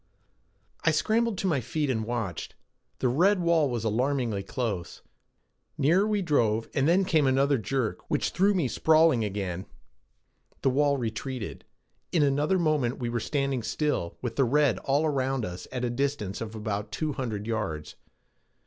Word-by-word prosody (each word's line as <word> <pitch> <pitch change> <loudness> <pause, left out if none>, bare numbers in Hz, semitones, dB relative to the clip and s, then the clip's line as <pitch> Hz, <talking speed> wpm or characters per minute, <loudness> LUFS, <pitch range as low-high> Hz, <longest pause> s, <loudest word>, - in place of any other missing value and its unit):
I - - +4
scrambled 225 -1 +1
to 195 - -3
my 150 -7 +1
feet 150 +5 -2
and 110 -5 -1
watched. 110 -7 -4 0.4
The 130 - +1
red 180 +11 +3
wall 170 -4 +3
was 120 -3 -2
alarmingly 120 -1 0
close. 95 - -4 0.7
Nearer 170 +9 +3
we 210 -2 0
drove 115 -9 +1
and 135 +1 +2
then 185 +3 +4
came 155 -6 +3
another 135 +1 +3
jerk 115 -5 -2
which - - 0
threw 200 +2 +3
me 170 -8 +1
sprawling 155 -1 +4
again. 95 -3 -3 1.0
The 135 - +3
wall 140 +1 +2
retreated. 120 0 -5 0.5
In 165 -4 +3
another 145 +6 +2
moment 150 -8 +1
we 120 -2 -3
were 120 0 -1
standing 135 +2 -1
still, 130 - -2
with 120 -2 -4
the 135 - +4
red 135 -4 +2
all 140 +3 +1
around 135 -4 0
us 90 0 -7
at 125 -1 -2
a - - 0
distance 120 -7 -2
of 110 -1 -5
about 105 -1 -3
two 155 -2 -2
hundred 110 -6 -4
yards. 95 -10 -3
130 Hz, 160 wpm, -27 LUFS, 110-150 Hz, 1.0 s, I